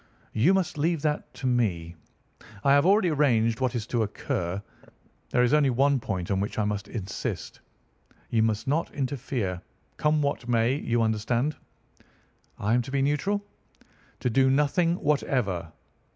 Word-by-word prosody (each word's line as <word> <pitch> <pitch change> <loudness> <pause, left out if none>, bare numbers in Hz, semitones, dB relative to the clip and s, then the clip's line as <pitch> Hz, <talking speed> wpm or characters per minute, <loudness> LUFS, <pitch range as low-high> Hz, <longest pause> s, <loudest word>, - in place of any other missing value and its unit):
"You 160 - +4
must 180 -5 -1
leave 160 0 0
that 150 -1 -1
to 135 - -7
me. 95 -10 0 0.7
I 140 - +4
have 140 +4 +5
already 195 -2 +4
arranged 120 -7 +2
what 130 -1 0
is 115 -3 -2
to 120 -1 -1
occur. 95 -3 -2 0.7
There 125 - +3
is 125 - +2
only 150 -2 +4
one 135 +2 +3
point 95 -6 -3
on 95 - +1
which 100 +2 -3
I 110 - +1
must 105 -1 -2
insist. 100 -3 -5 0.7
You 115 - +3
must 110 +2 0
not 155 +5 0
interfere, 125 -9 -2 0.4
come 150 0 +2
what 140 -4 -2
may. 115 +1 +3
You 120 -4 0
understand?" 115 +6 0 1.0
"I 105 +3 0
am 125 - +3
to 120 - -8
be 135 -1 +1
neutral?" 195 +9 0 0.8
"To 125 - +1
do 130 +3 +4
nothing 150 +5 +2
whatever. 125 - -1
125 Hz, 155 wpm, -27 LUFS, 110-145 Hz, 1.0 s, have